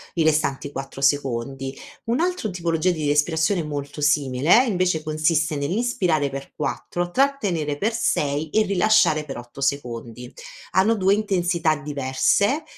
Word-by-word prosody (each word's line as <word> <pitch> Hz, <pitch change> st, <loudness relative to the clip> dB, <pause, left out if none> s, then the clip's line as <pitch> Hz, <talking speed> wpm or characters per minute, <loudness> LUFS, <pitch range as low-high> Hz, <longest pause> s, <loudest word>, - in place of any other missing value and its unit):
i 165 Hz, -, +2 dB
restanti 145 Hz, -2 st, 0 dB
4 135 Hz, -1 st, -7 dB
secondi. 135 Hz, -1 st, -1 dB, 0.3 s
Un'altro 320 Hz, +2 st, -1 dB
tipologia 170 Hz, -1 st, 0 dB
di 155 Hz, -4 st, -1 dB
respirazione 160 Hz, +5 st, +1 dB
molto 145 Hz, 0 st, -6 dB
simile 145 Hz, -, +3 dB
invece 180 Hz, -7 st, 0 dB
consiste 155 Hz, 0 st, 0 dB
nell'inspirare 170 Hz, -, 0 dB
per 135 Hz, 0 st, -8 dB
4 175 Hz, 0 st, -3 dB
trattenere 195 Hz, -, 0 dB
per 215 Hz, +8 st, 0 dB
6 150 Hz, -8 st, 0 dB
e 220 Hz, +7 st, +3 dB
rilasciare 195 Hz, -6 st, +3 dB
per 135 Hz, -4 st, -7 dB
8 120 Hz, +2 st, -10 dB
secondi. 125 Hz, -3 st, -3 dB, 0.4 s
Hanno 210 Hz, +5 st, +3 dB
2 195 Hz, -1 st, +3 dB
intensità 180 Hz, -6 st, +1 dB
diverse, 150 Hz, -, 0 dB
155 Hz, 125 wpm, -23 LUFS, 140-190 Hz, 0.4 s, simile